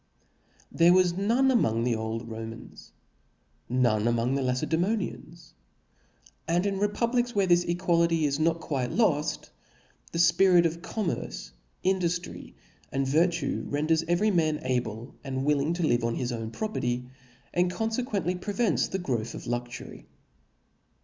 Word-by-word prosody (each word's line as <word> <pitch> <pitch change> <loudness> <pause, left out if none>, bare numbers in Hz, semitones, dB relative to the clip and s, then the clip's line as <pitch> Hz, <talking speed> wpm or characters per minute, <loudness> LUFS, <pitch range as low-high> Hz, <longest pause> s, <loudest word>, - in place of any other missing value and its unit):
There 170 +1 +5
was 180 -1 +4
pone 230 +8 +2
among 115 - +2
the 120 0 +1
olcl 110 +1 -3
Romans, 115 0 -9 0.8
none 120 -3 +2
among 120 +2 +1
the 140 - 0
La 130 -1 +1
cedaemonians; 170 - -2 0.9
and 175 +3 +1
in 195 -1 -1
republics 235 +4 0
where 200 -1 +3
this 175 -1 +4
equality 170 -2 +2
IS 140 0 0
not 165 +1 +2
quite 135 -7 -2
loft, 160 -10 0 0.6
the - - -4
fpirir 175 +1 +5
of 165 +1 -1
commerce, 180 - -4 0.3
induftry^ 180 -2 -1 0.4
and 135 0 0
virtue; 165 +1 +1
renders 155 +3 +1
every 185 +5 +2
man 155 -4 +1
able 120 -2 -2
and 135 -1 -3
willing 145 +1 +2
to 175 - -2
Jive 120 -6 +2
on 115 0 0
bis 125 -1 -2
own 115 -2 -4
prop^ty, 125 - -3 0.5
and 180 0 +2
confcquently 220 -4 -2
prcr 205 +2 -5
rents 235 -5 +2
the 190 - -3
growth 120 -11 -3
of - - -8
luxury. 120 0 -5
165 Hz, 140 wpm, -27 LUFS, 125-185 Hz, 0.9 s, There